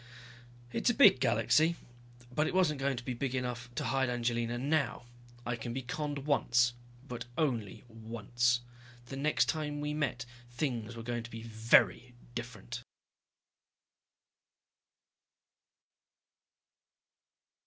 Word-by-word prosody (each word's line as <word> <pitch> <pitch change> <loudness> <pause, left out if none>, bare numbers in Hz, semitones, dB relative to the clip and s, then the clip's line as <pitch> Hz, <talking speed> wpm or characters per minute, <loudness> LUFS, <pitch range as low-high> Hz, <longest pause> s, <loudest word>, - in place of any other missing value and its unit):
It's - - +1
a 240 - +2
big 205 - +8
galaxy, 130 +7 +3 0.6
but 155 +4 +2
it - - -2
wasn't 160 -6 +3
going 135 -1 0
to 120 - -5
be 125 - -2
big 130 +2 -2
enough 120 -1 -3
to - - -1
hide 135 -1 +1
Angelina 120 -1 0
now. 140 0 0 0.4
I 120 +1 -1
can 115 +1 -5
be 130 +1 -3
conned 145 +2 -3
once 120 -4 +3 0.3
but 120 -2 -5
only 120 -10 -1
once. 115 +2 0 0.4
The 135 - -7
next 150 +3 +2
time 150 -2 -1
we 150 0 -2
met 140 -6 -1 0.2
things 120 -3 -3
were 115 - -7
going 120 0 -2
to 120 - -9
be 115 -1 -8
very 115 +2 +3 0.2
different. 120 0 -6
120 Hz, 120 wpm, -32 LUFS, 120-140 Hz, 0.6 s, big